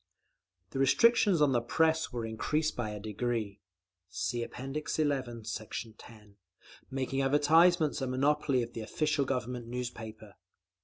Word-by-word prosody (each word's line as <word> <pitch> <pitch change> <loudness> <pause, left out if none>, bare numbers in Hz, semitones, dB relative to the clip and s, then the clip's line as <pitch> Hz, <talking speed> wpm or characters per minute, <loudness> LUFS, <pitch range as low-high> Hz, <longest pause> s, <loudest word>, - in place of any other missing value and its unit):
The 135 - -4
restrictions 200 - +4
on 145 - +4
the 120 -2 +2
Press 160 +6 +1
were 120 -2 -3
increased 150 +8 -1
by 120 -3 -2
a 105 0 -6
decree 110 -1 -3 0.5
(See 100 +6 -2
App. - - -9
XI, 150 +4 -2 0.4
Sect. 110 +1 -6
10) 105 -3 -15 0.5
making 135 0 -2
advertisements 155 +3 +4
a 130 - -1
monopoly 130 0 +1
of 115 - -8
the 115 - -5
official 150 +5 0
Government 125 -2 -3
newspaper. 110 -4 -7
125 Hz, 135 wpm, -31 LUFS, 115-150 Hz, 0.5 s, restrictions